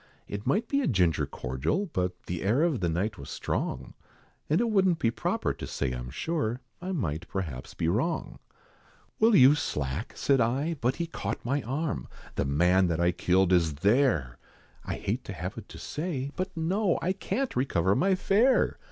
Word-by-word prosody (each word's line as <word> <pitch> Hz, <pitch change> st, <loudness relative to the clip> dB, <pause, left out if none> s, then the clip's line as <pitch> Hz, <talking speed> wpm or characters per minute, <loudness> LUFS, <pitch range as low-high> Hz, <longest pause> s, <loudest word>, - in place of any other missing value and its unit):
It 100 Hz, +1 st, -5 dB
might 215 Hz, -, +2 dB
be 280 Hz, 0 st, +1 dB
a -, -, 0 dB
ginger 90 Hz, -, +2 dB
cordial; 65 Hz, -, -2 dB
but 90 Hz, 0 st, -2 dB
The 90 Hz, -1 st, -4 dB
air 115 Hz, +10 st, +2 dB
of 165 Hz, -7 st, +1 dB
the 90 Hz, -2 st, 0 dB
night 95 Hz, +6 st, -1 dB
was 70 Hz, -, -8 dB
strong, -, -, -3 dB, 0.6 s
And 155 Hz, -, +3 dB
it 235 Hz, -1 st, +1 dB
wouldn't 190 Hz, -4 st, +3 dB
be 115 Hz, -8 st, +1 dB
proper -, -, -1 dB
to -, -, -7 dB
say 70 Hz, -3 st, -2 dB
I'm 60 Hz, 0 st, -5 dB
sure, 125 Hz, -, -2 dB, 0.2 s
I 185 Hz, +1 st, -4 dB
might 85 Hz, -, -2 dB
perhaps 80 Hz, -10 st, -5 dB
be 80 Hz, -, -1 dB
wrong. 130 Hz, -, -1 dB, 0.8 s
"Will 225 Hz, 0 st, +5 dB
you 135 Hz, -1 st, +8 dB
slack?" 75 Hz, -, -3 dB
said 135 Hz, -3 st, +2 dB
I, 135 Hz, +8 st, +1 dB
but 125 Hz, +2 st, +1 dB
he 170 Hz, -, -2 dB
caught 115 Hz, -10 st, -5 dB
my 140 Hz, +4 st, 0 dB
arm 140 Hz, +6 st, -3 dB, 0.3 s
"The -, -, -1 dB
man 90 Hz, +7 st, +3 dB
that 85 Hz, -1 st, -1 dB
I 85 Hz, 0 st, +3 dB
killed 90 Hz, +1 st, +2 dB
is 80 Hz, -4 st, +3 dB
there! 95 Hz, -, +2 dB, 0.4 s
I -, -, -3 dB
hate 115 Hz, +6 st, -2 dB
to 100 Hz, -, -5 dB
have 90 Hz, +3 st, -5 dB
it 110 Hz, -3 st, -9 dB
to -, -, -10 dB
say. 145 Hz, -4 st, -3 dB
But 185 Hz, -1 st, -4 dB
no, 180 Hz, +4 st, +1 dB
I 185 Hz, -, 0 dB
can't 255 Hz, +7 st, -2 dB
recover 95 Hz, -8 st, +2 dB
my 190 Hz, -, +3 dB
fare! 215 Hz, +8 st, +3 dB
115 Hz, 185 wpm, -28 LUFS, -, 0.8 s, you